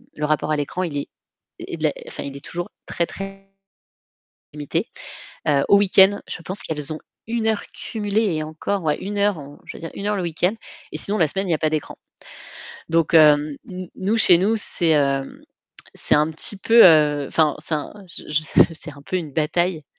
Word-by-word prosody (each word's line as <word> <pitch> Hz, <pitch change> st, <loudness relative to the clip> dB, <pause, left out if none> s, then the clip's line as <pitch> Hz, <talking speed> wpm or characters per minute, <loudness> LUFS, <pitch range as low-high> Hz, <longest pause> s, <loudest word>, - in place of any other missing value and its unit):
le 150 Hz, -, -2 dB
rapport 155 Hz, 0 st, 0 dB
à 155 Hz, -, +2 dB
l'écran 145 Hz, +5 st, -2 dB
il 160 Hz, -5 st, -3 dB
est -, -, -5 dB, 0.5 s
il -, -, -4 dB
est -, -, +2 dB
enfin -, -, -7 dB
il 140 Hz, 0 st, -7 dB
est 140 Hz, -, -13 dB
toujours 175 Hz, +1 st, -5 dB, 0.2 s
très 170 Hz, -, -1 dB
très 195 Hz, 0 st, -9 dB, 1.1 s
limité. 145 Hz, -2 st, -2 dB, 0.8 s
Au 200 Hz, -, +7 dB
week-end, 195 Hz, 0 st, +5 dB
je -, -, -6 dB
pense 190 Hz, +3 st, -5 dB
qu'elles 150 Hz, -1 st, -2 dB
ont 155 Hz, -, -5 dB, 0.3 s
1 225 Hz, 0 st, -2 dB
heure 215 Hz, -2 st, 0 dB
cumulée 210 Hz, -4 st, -1 dB
et 155 Hz, -, -2 dB
encore 160 Hz, +2 st, -2 dB
1 205 Hz, +1 st, -4 dB
heure, 160 Hz, -9 st, -1 dB
je -, -, -8 dB
veux -, -, -12 dB
dire 165 Hz, -, -5 dB
1 200 Hz, -, -5 dB
heure 210 Hz, 0 st, +1 dB
le 185 Hz, -, -2 dB
week-end 175 Hz, +3 st, 0 dB, 0.4 s
et -, -, -3 dB
sinon 205 Hz, +6 st, -1 dB
la 160 Hz, -3 st, +3 dB
semaine 195 Hz, +3 st, -3 dB
il -, -, -2 dB
y -, -, +4 dB
a -, -, -1 dB
pas 155 Hz, -, +1 dB
d'écran. 155 Hz, -2 st, -3 dB, 0.9 s
Donc 165 Hz, 0 st, +2 dB
hem, 150 Hz, -2 st, +5 dB
n 185 Hz, -1 st, -6 dB
n -, -, -15 dB
nous 205 Hz, +4 st, 0 dB
chez 185 Hz, -5 st, +7 dB
nous, 215 Hz, +5 st, +2 dB
c'est, 175 Hz, -5 st, +1 dB
hem, 140 Hz, -3 st, +1 dB, 0.5 s
c'est -, -, 0 dB
un 150 Hz, +2 st, +2 dB
petit 165 Hz, +6 st, -3 dB
peu, 230 Hz, +3 st, +6 dB
heu, 150 Hz, -3 st, +4 dB
enfin 155 Hz, -3 st, +2 dB
c'est 160 Hz, -, -3 dB
un 150 Hz, -, -4 dB, 0.2 s
je -, -, -4 dB
je 150 Hz, +1 st, 0 dB
s 155 Hz, -, -12 dB, 0.2 s
je -, -, -9 dB
c'est 155 Hz, -1 st, -8 dB
un 140 Hz, -, -14 dB
peu 185 Hz, -, -3 dB
une 160 Hz, -5 st, -5 dB
bataille, 160 Hz, +2 st, 0 dB
165 Hz, 210 wpm, -22 LUFS, 150-195 Hz, 1.1 s, Au